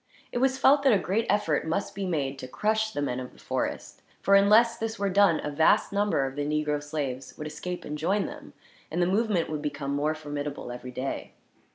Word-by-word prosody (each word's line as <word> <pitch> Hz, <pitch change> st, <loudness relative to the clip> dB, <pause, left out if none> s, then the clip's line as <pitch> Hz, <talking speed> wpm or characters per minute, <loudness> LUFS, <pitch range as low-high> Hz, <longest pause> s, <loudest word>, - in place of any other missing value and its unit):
It 245 Hz, -, -1 dB
was 265 Hz, +1 st, +2 dB
felt 280 Hz, +2 st, +5 dB
that 270 Hz, -3 st, +5 dB
a -, -, +5 dB
great 195 Hz, +4 st, -1 dB
effort 165 Hz, -7 st, +1 dB
must 170 Hz, +5 st, -1 dB
be 195 Hz, -1 st, -3 dB
made, 140 Hz, -5 st, -2 dB
to 130 Hz, -, -6 dB
crush 220 Hz, +9 st, 0 dB
the 145 Hz, -, -2 dB
men 125 Hz, -2 st, -2 dB
of 125 Hz, -1 st, -7 dB
the -, -, -20 dB
forest; -, -, -4 dB, 0.2 s
for 195 Hz, -, +2 dB
unless 210 Hz, +4 st, +6 dB
this 225 Hz, 0 st, -4 dB
were 200 Hz, -1 st, 0 dB
done, 195 Hz, -4 st, +4 dB
a 150 Hz, -, -3 dB
vast 160 Hz, +6 st, +3 dB
number 200 Hz, -8 st, +1 dB
of 135 Hz, 0 st, -5 dB
the 145 Hz, -, -2 dB
negro 150 Hz, 0 st, 0 dB
slaves 140 Hz, -3 st, -4 dB
would 155 Hz, -, -6 dB
escape 180 Hz, +4 st, -5 dB
and 150 Hz, -, -4 dB
join 195 Hz, +6 st, +1 dB
them, -, -, -9 dB, 0.4 s
and 165 Hz, -, -3 dB
the 175 Hz, -, +4 dB
movement 195 Hz, -2 st, +1 dB
would 155 Hz, -1 st, -4 dB
become 145 Hz, -2 st, -3 dB
more 150 Hz, +2 st, 0 dB
formidable, 145 Hz, -4 st, -5 dB
every 125 Hz, +1 st, -7 dB
day. 130 Hz, +2 st, -4 dB
160 Hz, 220 wpm, -27 LUFS, 145-205 Hz, 0.4 s, unless